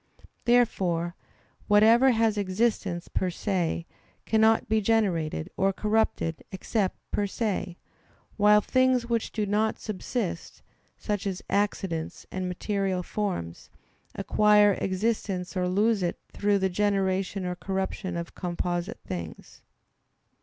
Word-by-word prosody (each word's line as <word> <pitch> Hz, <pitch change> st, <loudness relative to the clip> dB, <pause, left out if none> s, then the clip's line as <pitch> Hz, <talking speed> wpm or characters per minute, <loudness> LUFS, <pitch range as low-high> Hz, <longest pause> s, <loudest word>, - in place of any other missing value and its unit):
Therefore, 185 Hz, -8 st, +2 dB, 0.5 s
whatever 225 Hz, +5 st, +6 dB
has 225 Hz, -3 st, +2 dB
existence 195 Hz, -3 st, -1 dB
per 185 Hz, -, -1 dB
se 175 Hz, -2 st, -1 dB, 0.4 s
cannot 220 Hz, 0 st, +3 dB
be 220 Hz, 0 st, +2 dB
generated 185 Hz, -8 st, +1 dB
or 195 Hz, 0 st, +2 dB
corrupted 210 Hz, -5 st, 0 dB
except 190 Hz, +1 st, -1 dB
"per 205 Hz, -, 0 dB
se"; 195 Hz, -4 st, -2 dB, 0.6 s
while 210 Hz, 0 st, +5 dB
things 255 Hz, +1 st, +2 dB
which 235 Hz, -1 st, -1 dB
do 215 Hz, -2 st, -1 dB
not 210 Hz, +2 st, +1 dB
subsist, 210 Hz, -3 st, -4 dB, 0.3 s
such 205 Hz, -2 st, -2 dB
as 190 Hz, -2 st, -4 dB
accidents 195 Hz, -5 st, -1 dB
and 185 Hz, -1 st, -3 dB
material 190 Hz, 0 st, -1 dB
forms, 180 Hz, -, -4 dB, 0.5 s
acquire 210 Hz, -1 st, +4 dB
existence 190 Hz, -2 st, -1 dB
or 180 Hz, -1 st, 0 dB
lose 210 Hz, +3 st, +2 dB
it 175 Hz, -1 st, -1 dB, 0.2 s
through 205 Hz, 0 st, +2 dB
the 190 Hz, -1 st, +1 dB
generation 195 Hz, 0 st, 0 dB
or 180 Hz, -, -2 dB
corruption 190 Hz, -1 st, -3 dB
of 170 Hz, 0 st, -6 dB
composite 175 Hz, 0 st, -3 dB
things. 85 Hz, -3 st, -7 dB
195 Hz, 115 wpm, -27 LUFS, 180-215 Hz, 0.6 s, whatever